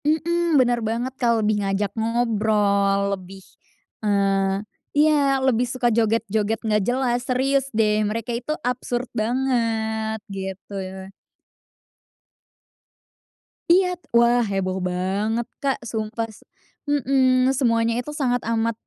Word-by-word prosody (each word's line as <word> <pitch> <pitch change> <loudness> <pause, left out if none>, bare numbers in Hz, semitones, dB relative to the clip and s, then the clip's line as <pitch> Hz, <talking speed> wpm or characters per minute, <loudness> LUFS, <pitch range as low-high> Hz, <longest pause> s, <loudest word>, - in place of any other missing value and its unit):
Mhm 335 +1 +2
benar 245 -2 +3
banget 230 +4 -2
Kak, 235 -1 +3
lebih 210 -1 +1
ngajak 195 +1 -1
ngobrol, 210 -3 +1
lebih, 190 0 -8 0.6
eee 195 -1 +1 0.3
iya 290 -2 +4
lebih 245 -2 +3
suka 255 -1 0
joget-joget 220 -1 +1
enggak 210 -2 +2
jelas, 245 -1 +1
serius 270 +1 +2
deh 215 -1 +3
mereka 230 +2 -3
itu 240 +5 -3
absurd 250 0 -2
banget, 220 -2 -1
gitu 190 +1 -6
ya. 190 +1 -8 2.6
Iya, 365 +2 +5 0.3
wah 235 +1 +4
heboh 195 -4 -1
banget 200 +6 -1 0.2
Kak, 275 -1 0
sumpah 220 0 -3 0.6
mhm 260 -2 +3
semuanya 230 -3 +2
itu 250 - -9
sangat 245 -2 +1
amat 230 0 +1
230 Hz, 110 wpm, -23 LUFS, 205-255 Hz, 2.6 s, Iya